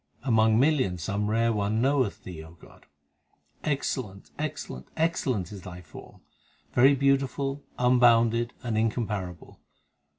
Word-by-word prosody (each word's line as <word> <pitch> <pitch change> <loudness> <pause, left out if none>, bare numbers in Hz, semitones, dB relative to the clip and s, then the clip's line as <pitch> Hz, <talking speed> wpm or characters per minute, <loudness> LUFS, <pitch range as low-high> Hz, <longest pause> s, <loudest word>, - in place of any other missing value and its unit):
Among 110 -3 +3
millions 130 - +1
some 105 +2 -1
rare 115 +1 +2
one 105 +1 0
knoweth 130 -3 +1
Thee, 85 -4 -8 0.2
God; - - -18 0.8
Excellent, 130 -9 -3
excellent, 65 +1 -5
excellent 130 - 0
is 100 -2 -8
Thy 90 -1 -9
form, 75 - -13 0.5
Very 135 +3 +6
beautiful, 135 +1 0
unbounded, 120 -1 +4
and 115 -3 -1
incomparable. 105 -6 -3
115 Hz, 110 wpm, -27 LUFS, 100-135 Hz, 0.8 s, Very